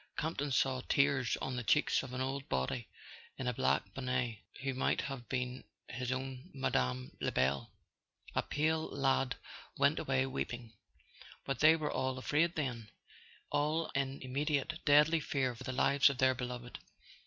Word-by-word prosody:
Camp 160 Hz, -1 st, -2 dB
ton 145 Hz, 0 st, -1 dB
saw 130 Hz, 0 st, +2 dB
tears 140 Hz, -3 st, +3 dB
on 130 Hz, -, -2 dB
the 120 Hz, -, -2 dB
cheeks 150 Hz, +6 st, +3 dB
of 130 Hz, -, -8 dB
an 130 Hz, 0 st, -3 dB
old 135 Hz, +1 st, -3 dB
body 65 Hz, -, -1 dB, 0.5 s
in 130 Hz, -, -4 dB
a 125 Hz, -, +1 dB
black 70 Hz, -, +1 dB
bonnet 125 Hz, -4 st, -1 dB, 0.2 s
who 135 Hz, -1 st, 0 dB
might 130 Hz, -, +1 dB
have 135 Hz, -3 st, -6 dB
been 125 Hz, 0 st, -2 dB, 0.3 s
his 125 Hz, 0 st, -3 dB
own 130 Hz, +3 st, -4 dB
Mme. 65 Hz, -, 0 dB
Lebel. 65 Hz, +2 st, +1 dB, 0.6 s
A -, -, +2 dB
pale 160 Hz, +2 st, 0 dB
lad 135 Hz, -2 st, +1 dB, 0.4 s
went -, -, +3 dB
away 135 Hz, -1 st, +1 dB
weeping. 120 Hz, -3 st, -4 dB, 0.7 s
But 135 Hz, -3 st, -2 dB
they 155 Hz, +1 st, +7 dB
were 155 Hz, -2 st, -2 dB
all 130 Hz, 0 st, -1 dB
afraid, 155 Hz, +6 st, +1 dB
then, 125 Hz, -8 st, -3 dB, 0.6 s
all 155 Hz, +3 st, +1 dB
in 140 Hz, 0 st, -1 dB
immediate 145 Hz, +3 st, -1 dB
deadly 150 Hz, +2 st, +6 dB
fear 135 Hz, -4 st, 0 dB
for 125 Hz, +2 st, -10 dB
the -, -, -2 dB
lives 140 Hz, +2 st, +4 dB
of 140 Hz, -, -3 dB
their 130 Hz, 0 st, +4 dB
beloved! 125 Hz, -1 st, -6 dB
130 Hz, 160 wpm, -34 LUFS, 125-140 Hz, 0.7 s, they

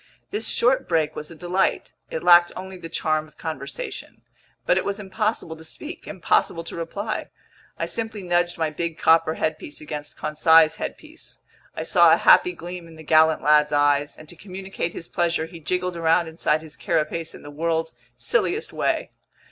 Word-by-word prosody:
This 215 Hz, +2 st, -2 dB
short 250 Hz, +2 st, +2 dB
break 160 Hz, -3 st, +1 dB
was 150 Hz, -, -6 dB
a 165 Hz, -, -10 dB
delight. 180 Hz, +4 st, -1 dB, 0.2 s
It -, -, -4 dB
lacked 175 Hz, 0 st, +7 dB
only 190 Hz, +1 st, -7 dB
the 170 Hz, -2 st, -9 dB
charm 155 Hz, -1 st, -1 dB
of 150 Hz, -, -24 dB
conversation. 140 Hz, -4 st, -6 dB, 0.4 s
But 180 Hz, -, +3 dB
it -, -, -3 dB
was 200 Hz, +1 st, -3 dB
impossible 205 Hz, -4 st, -2 dB
to 160 Hz, -, -13 dB
speak, 305 Hz, -, -8 dB
impossible 175 Hz, -2 st, 0 dB
to -, -, -8 dB
reply. 200 Hz, +6 st, -4 dB, 0.5 s
I -, -, -1 dB
simply 225 Hz, -3 st, -4 dB
nudged 175 Hz, 0 st, +1 dB
my 160 Hz, -2 st, 0 dB
big 170 Hz, +1 st, -3 dB
copper 160 Hz, 0 st, +4 dB
headpiece 155 Hz, -2 st, -3 dB
against 150 Hz, -1 st, -7 dB
Conseil's 160 Hz, +1 st, +4 dB
headpiece. 315 Hz, +1 st, -8 dB, 0.4 s
I -, -, -3 dB
saw -, -, +5 dB
a -, -, +5 dB
happy 360 Hz, -, +5 dB
gleam 175 Hz, -, -8 dB
in 165 Hz, -, -14 dB
the 160 Hz, -, -12 dB
gallant 160 Hz, 0 st, +4 dB
lad's 150 Hz, 0 st, +4 dB
eyes, 145 Hz, 0 st, +2 dB
and 155 Hz, -, -13 dB
to 175 Hz, -, -11 dB
communicate 190 Hz, -1 st, -5 dB
his 165 Hz, -, -7 dB
pleasure, 170 Hz, -2 st, 0 dB
he 165 Hz, +1 st, -11 dB
jiggled 180 Hz, +3 st, -2 dB
around 165 Hz, 0 st, +2 dB
inside 160 Hz, -1 st, 0 dB
his 155 Hz, -2 st, -11 dB
carapace 165 Hz, +2 st, -2 dB
in -, -, -13 dB
the 145 Hz, -, -9 dB
world's 160 Hz, +1 st, -1 dB, 0.2 s
silliest 445 Hz, -3 st, 0 dB
way. -, -, -1 dB
165 Hz, 180 wpm, -23 LUFS, 155-185 Hz, 0.5 s, lacked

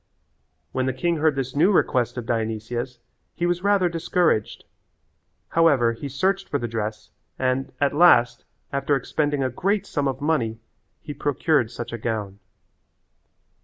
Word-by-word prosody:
When 130 Hz, 0 st, -1 dB
the 130 Hz, -, 0 dB
king 170 Hz, +3 st, 0 dB
heard 155 Hz, -1 st, +2 dB
this 135 Hz, -1 st, -3 dB
new 170 Hz, +8 st, +4 dB
request 125 Hz, -, +1 dB
of 120 Hz, -, -4 dB
Dionysia's 115 Hz, +2 st, -3 dB, 0.4 s
he 175 Hz, -, -1 dB
was 175 Hz, 0 st, 0 dB
rather 200 Hz, -2 st, +3 dB
discouraged. 170 Hz, -7 st, 0 dB, 0.9 s
However 140 Hz, -8 st, +3 dB
he 140 Hz, +5 st, -7 dB
searched 190 Hz, +8 st, 0 dB
for 145 Hz, -, 0 dB
the 120 Hz, -, -3 dB
dress 110 Hz, -1 st, -4 dB, 0.3 s
and, 130 Hz, +1 st, -1 dB
at 140 Hz, -1 st, +2 dB
last, 145 Hz, -7 st, +5 dB, 0.3 s
after 140 Hz, +1 st, +1 dB
expending 145 Hz, +1 st, -1 dB
a 130 Hz, -, -1 dB
great 200 Hz, -, 0 dB
sum 145 Hz, -7 st, -1 dB
of 135 Hz, -1 st, -2 dB
money, 130 Hz, -7 st, 0 dB, 0.4 s
he 145 Hz, -, -6 dB
procured 145 Hz, -3 st, +1 dB
such 120 Hz, 0 st, -7 dB
a 115 Hz, -, -4 dB
gown. 105 Hz, -3 st, -3 dB
135 Hz, 150 wpm, -24 LUFS, 120-160 Hz, 0.9 s, last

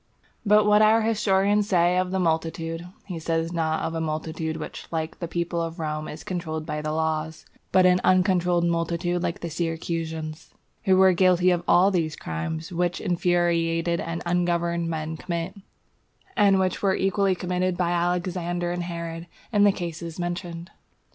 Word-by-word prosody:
But 210 Hz, 0 st, +5 dB
what 210 Hz, 0 st, +5 dB
our 220 Hz, +1 st, +5 dB
historian 205 Hz, -2 st, +2 dB
says 180 Hz, -3 st, +3 dB
of 185 Hz, -, -3 dB
the 190 Hz, -, -1 dB
multitude, 165 Hz, 0 st, -1 dB, 0.2 s
he 180 Hz, -4 st, -5 dB
says 165 Hz, +1 st, -1 dB
not 160 Hz, -2 st, 0 dB
of 160 Hz, -, -2 dB
a 165 Hz, -, -2 dB
multitude 160 Hz, 0 st, -3 dB
which -, -, -7 dB
like 160 Hz, -1 st, -4 dB
the 170 Hz, -, -3 dB
people 170 Hz, 0 st, -2 dB
of 165 Hz, +1 st, -4 dB
Rome 155 Hz, -2 st, -3 dB
is 150 Hz, -, -8 dB
controlled 160 Hz, -5 st, -4 dB
by 150 Hz, -1 st, -3 dB
the 155 Hz, 0 st, -3 dB
laws, 160 Hz, 0 st, -2 dB, 0.3 s
but 185 Hz, -1 st, +5 dB
of 180 Hz, -, +7 dB
an 180 Hz, -, +2 dB
uncontrolled 180 Hz, -2 st, +3 dB
multitude 170 Hz, +1 st, 0 dB
like 170 Hz, -1 st, -3 dB
the 170 Hz, -, -4 dB
Syracusans, 160 Hz, -1 st, -4 dB, 0.3 s
who 190 Hz, -2 st, +4 dB
were 190 Hz, 0 st, +6 dB
guilty 180 Hz, 0 st, +4 dB
of 175 Hz, -1 st, +1 dB
all 190 Hz, +3 st, +5 dB
these 160 Hz, -5 st, 0 dB
crimes 80 Hz, -, -5 dB
which 175 Hz, 0 st, -1 dB
infuriated 170 Hz, -1 st, +1 dB
and 165 Hz, 0 st, -4 dB
ungoverned 170 Hz, -1 st, 0 dB
men 160 Hz, 0 st, -3 dB
commit, 170 Hz, +1 st, -4 dB, 0.8 s
and 200 Hz, -2 st, +5 dB
which 185 Hz, -1 st, 0 dB
were 195 Hz, -2 st, +2 dB
equally 195 Hz, 0 st, +1 dB
committed 180 Hz, 0 st, -1 dB
by 175 Hz, -1 st, +1 dB
Alexander 175 Hz, 0 st, -1 dB
and 175 Hz, 0 st, -2 dB
Herod 170 Hz, -1 st, -5 dB, 0.3 s
in 205 Hz, -1 st, +5 dB
the 205 Hz, -, +6 dB
cases 170 Hz, -3 st, -6 dB
mentioned. 175 Hz, -1 st, -5 dB
170 Hz, 165 wpm, -25 LUFS, 165-180 Hz, 0.8 s, of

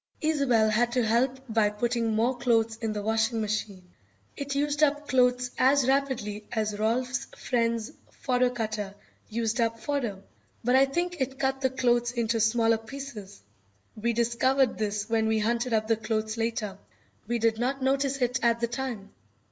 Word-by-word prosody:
Isobel 275 Hz, -9 st, +2 dB
had 240 Hz, +2 st, +2 dB
to 250 Hz, -2 st, +2 dB
help 245 Hz, +4 st, +2 dB
by 220 Hz, -2 st, +2 dB
putting 230 Hz, +1 st, -1 dB
more 235 Hz, +4 st, +2 dB
clothes 230 Hz, -2 st, +1 dB
in 225 Hz, -1 st, -2 dB
the 210 Hz, -1 st, -4 dB
washing 220 Hz, +2 st, +1 dB
machine. 205 Hz, -4 st, -3 dB, 0.4 s
It 280 Hz, 0 st, -4 dB
used 290 Hz, +1 st, 0 dB
up 295 Hz, 0 st, +2 dB
clothes 250 Hz, -1 st, +2 dB
as 265 Hz, 0 st, +4 dB
rapidly 265 Hz, -7 st, 0 dB
as 215 Hz, -2 st, -2 dB
Rolf's 245 Hz, +3 st, 0 dB
friend's 230 Hz, 0 st, -1 dB, 0.2 s
fodder 250 Hz, -2 st, +1 dB
cutter 215 Hz, -4 st, -4 dB, 0.3 s
used 230 Hz, +1 st, -1 dB
up 230 Hz, 0 st, 0 dB
fodder, 250 Hz, -7 st, -2 dB, 0.5 s
but 245 Hz, +2 st, +3 dB
I 265 Hz, +1 st, +6 dB
think 345 Hz, +3 st, -2 dB
it 265 Hz, +1 st, -2 dB
cut 270 Hz, 0 st, -1 dB
the 260 Hz, -, +2 dB
clothes 240 Hz, -2 st, +1 dB
into 230 Hz, -1 st, 0 dB
smaller 225 Hz, +1 st, +3 dB
pieces. 225 Hz, -5 st, -9 dB, 0.5 s
We 235 Hz, +2 st, -1 dB
discovered 240 Hz, +3 st, +2 dB
this 210 Hz, 0 st, -2 dB
when 225 Hz, -1 st, +1 dB
we 220 Hz, 0 st, +2 dB
hunted 235 Hz, +3 st, 0 dB
up 220 Hz, -1 st, +2 dB
the 225 Hz, -1 st, +2 dB
clothes 215 Hz, 0 st, -2 dB
later. 225 Hz, -4 st, -2 dB, 0.5 s
We 240 Hz, +1 st, 0 dB
did 225 Hz, -1 st, +1 dB
not 265 Hz, +2 st, -1 dB
notice 275 Hz, 0 st, +1 dB
it 245 Hz, 0 st, 0 dB
at 235 Hz, 0 st, +2 dB
the 235 Hz, -, 0 dB
time. 235 Hz, -5 st, -5 dB
235 Hz, 165 wpm, -27 LUFS, 220-260 Hz, 0.5 s, I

